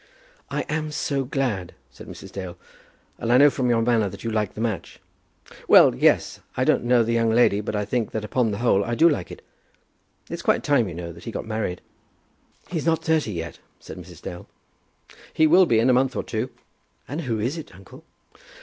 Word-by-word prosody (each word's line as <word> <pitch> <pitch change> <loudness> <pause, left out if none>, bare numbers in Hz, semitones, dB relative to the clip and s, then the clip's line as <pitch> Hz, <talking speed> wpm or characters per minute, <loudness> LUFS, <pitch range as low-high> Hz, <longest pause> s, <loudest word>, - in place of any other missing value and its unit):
"I - - -2
am 155 0 -3
so 140 -2 -1
glad," 125 -10 -2 0.2
said - - -13
Mrs. - - -10
Dale; 95 -3 -7 0.6
"and 115 - -1
I 125 - +6
know 145 +2 +7
from 125 -2 -1
your 115 -1 +2
manner 115 -4 +2
that 100 - -11
you 115 - -2
like 105 -2 -1
the - - -8
match." 110 -5 -3 0.7
"Well, - - +7
yes. - - +2 0.2
I - - +2
don't - - +2
know 120 -1 +4
the 115 +1 -1
young 115 -1 +2
lady, 110 -3 +3
but 105 - -4
I 105 0 -1
think 115 +1 -1
that 110 -1 -4
upon 120 +1 0
the 100 - -3
whole 105 -4 +2
I 120 +3 -2
do 165 +7 +5
like 145 - 0
it. - - -11 0.8
It's - - -6
quite - - +1
time, 125 -8 +2
you 85 - -8
know, 85 0 -6
that 85 +1 -13
he 115 - -5
got - - -5
married." 110 -5 -3 0.9
"He's 170 -2 -3
not 165 -1 +1
thirty 160 -9 +1
yet," 85 -1 -6 0.2
said - - -10
Mrs. - - -13
Dale. 85 - -8 0.9
"He 160 - +4
will 175 +3 +6
be, 115 - +3
in 115 +3 +3
a 130 - +5
month 130 +1 +2
or - - -2
two." 115 +3 -3 0.6
"And 150 +5 -4
who 115 -7 -2
is 120 +8 -1
it, 160 - -9
uncle?" 125 - -15
115 Hz, 215 wpm, -24 LUFS, 105-135 Hz, 0.9 s, know